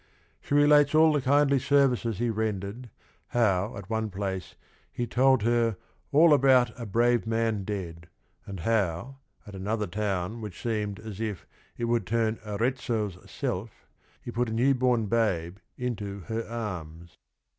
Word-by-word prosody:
She 145 - -2
relates 145 0 +5
all 160 0 +6
the 145 - +1
kindly 140 +1 +3
services 125 -6 +2
he 120 0 0
rendered, 110 +2 -3 0.4
how 105 -3 +1
at - - -9
one 110 -1 -1
place 95 -1 -4 0.4
he 120 - -3
told 130 0 +3
her 115 -2 +2 0.2
" - - -40
all 155 +2 +6
about 130 -4 +5
a 115 -2 -7
brave 120 +1 +2
man 115 -2 0
dead," 85 -4 -5 0.4
and 95 -3 -6
how, 110 +4 -1 0.3
at 105 - -11
another 105 +3 -2
town 100 +2 -3
which 105 -5 -7
seemed 105 -3 -2
as 110 -1 -8
if 105 -5 -4 0.3
it 120 - -2
"would 115 -5 0
turn 115 0 0
Arezzo's 110 -3 -2
self," 105 +5 -4 0.4
he 120 - -6
put 120 0 -1
a - - -3
new 125 +5 +3
born 125 -3 +1
babe 95 -6 0 0.2
into 105 -5 -4
her 115 +5 -4
arms. 85 -8 -6
115 Hz, 155 wpm, -27 LUFS, 100-120 Hz, 0.4 s, all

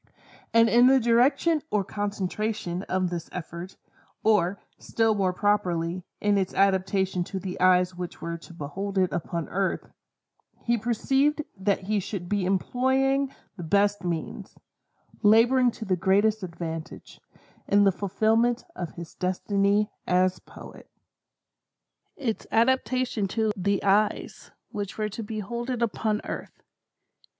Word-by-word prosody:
And 230 0 +5
in 240 +2 +6
the 265 0 +6
direction 270 +7 +3
or 210 -2 +1
concentration 205 -2 -3
of 185 -1 0
this 170 -2 -5
effort, 175 +1 -7 0.5
or, 200 -3 +2 0.2
still 225 -1 +1
more 195 -3 +1
properly, 180 -3 0 0.2
in 205 -1 +2
its 190 -1 -2
adaption 190 -1 +2
to 190 - -5
the 185 -1 -6
eyes 180 0 +4
which 175 0 -7
were 170 0 -4
to 165 - -14
behold 195 +7 -5
it 185 -1 +2
upon 170 -1 -3
earth, 195 0 -2 0.7
he 235 - +3
perceived 270 +6 +1
that 195 0 0
he 205 +2 0
should 185 -2 -5
be 200 -1 0
employing 265 +7 +1 0.3
the 175 - -6
best 200 +4 +2
means—laboring 225 +7 0
to 225 -1 -7
the 190 -2 +1
greatest 205 +4 +2
advantage—in 170 +3 -4
the 195 - +5
fulfilment 220 +5 +1
of 175 -3 -5
his 170 -2 -9
destiny 200 +3 +1 0.2
as 185 0 +2
Poet. - - -13 1.3
"Its 235 -7 -3
adaptation 255 -2 +1
to 220 +2 0
the 200 +1 0
eyes 205 +2 +1 0.2
which 205 -1 -5
were 215 -1 -1
to 215 - -6
behold 225 +3 -5
it 245 -2 -1
upon 215 -1 -1
earth." - - -7
200 Hz, 130 wpm, -26 LUFS, 185-225 Hz, 1.3 s, in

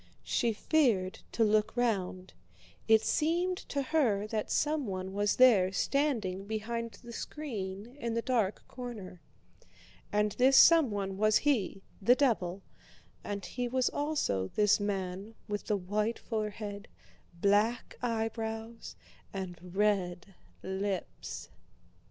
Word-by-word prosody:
She 235 - +1
feared 220 - +1
to 230 - +2
look 215 +2 +2
round, 190 -6 -1 0.5
it 220 0 +6
seemed 350 +4 +1
to 280 -1 -1
her 255 -9 +1
that 215 -1 -2
someone 200 -12 -1
was 205 +1 +1
there 215 -8 +6
standing 215 -7 0
behind 230 +2 -3
the 235 0 -9
screen 225 -6 -6
in 235 -3 -2
the 230 - -1
dark 225 -6 0
corner. 220 -8 -8 0.9
And 210 0 +2
this 265 +4 +4
someone 205 - +5
was 215 0 +5
he—the 220 -3 +1
devil—and 200 -3 -3
he 245 0 -3
was 255 +1 +1
also 290 - -1
this 210 0 +4
man 195 +1 -3
with 205 -1 -3
the 210 - +2
white 210 +5 -1
forehead, 210 -2 -4 0.5
black 210 +5 +2
eyebrows, 225 -1 -3 0.4
and 190 -2 -5
red 185 -1 -1 0.3
lips. 190 - -4
215 Hz, 110 wpm, -31 LUFS, 195-245 Hz, 0.9 s, it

